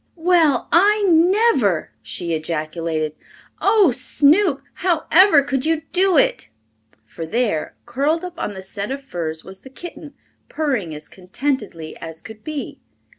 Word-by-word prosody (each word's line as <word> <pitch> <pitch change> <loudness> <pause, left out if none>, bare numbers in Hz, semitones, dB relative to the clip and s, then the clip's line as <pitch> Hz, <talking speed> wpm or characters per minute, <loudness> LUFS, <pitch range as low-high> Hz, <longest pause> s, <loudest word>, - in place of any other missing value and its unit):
"Well, 325 -6 +2
I 415 +4 +4
never!" 335 - +3
she 170 -1 -4
ejaculated. 155 0 -3 0.5
"Oh, 410 -9 +4
Snoop! 280 - +2
however 345 -2 +4
could 270 -2 -2
you 320 0 0
do 375 -2 +3
it!" 105 - +2 0.6
For 165 +9 -8
there, 205 -2 -1
curled 285 +8 0
up 360 -1 -7
on 205 - -3
the 190 - -8
set 200 +2 -5
of 275 +1 -5
furs, 160 -10 -5
was 190 0 -9
the 265 - -13
kitten, 295 0 -10 0.3
purring 250 - -2
as 150 0 -9
contentedly 195 - -4
as 160 0 -9
could 220 -1 -12
be. 305 -2 -6
270 Hz, 135 wpm, -20 LUFS, -, 0.6 s, I